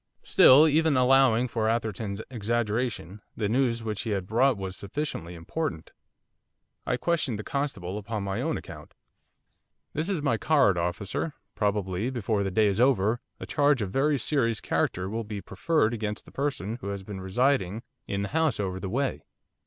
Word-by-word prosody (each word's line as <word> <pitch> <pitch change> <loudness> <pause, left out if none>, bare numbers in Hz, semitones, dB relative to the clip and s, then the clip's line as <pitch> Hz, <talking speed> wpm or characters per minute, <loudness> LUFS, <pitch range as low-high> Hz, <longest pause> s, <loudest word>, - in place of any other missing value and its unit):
Still, 145 +5 +7
even 155 -1 +3
allowing 125 -2 +4
for 110 -2 0
Atherton's 110 -2 -2
exaggeration, 110 -3 -2 0.2
the 105 - 0
news 115 0 +1
which 105 -3 -3
he 115 - -4
had 100 -3 -1
brought 120 +4 +3
was 95 -1 -5
sufficiently 100 - -4
important. 85 - -4 1.0
I 125 - +1
questioned 150 -5 0
the 110 - -6
constable 105 -10 -3
upon 105 0 -4
my 100 0 -2
own - - -1
account. - - -11 1.0
'There 155 - -1
is 170 -2 -2
my 120 -6 +2
card, 140 - +3
officer, 90 - -2 0.2
probably, 100 +1 -1
before 110 -5 -1
the 100 - 0
day 105 +3 +3
is 100 +2 +1
over, 120 -3 +3 0.2
a - - -6
charge 145 -5 +2
of 100 - -3
a - - -11
very 140 +5 +2
serious 115 -4 0
character 90 +1 -1
will 115 +3 -3
be 105 -1 -6
preferred 115 - 0
against 105 -2 -4
the - - -15
person 130 -6 -2
who - - -6
has 100 -1 -4
been 95 -1 -7
residing 110 +1 +1 0.2
in 100 0 -2
the 100 - -3
house 160 -7 +1
over 95 -2 -2
the 95 - -4
way. 135 +6 -1
110 Hz, 175 wpm, -27 LUFS, 100-135 Hz, 1.0 s, Still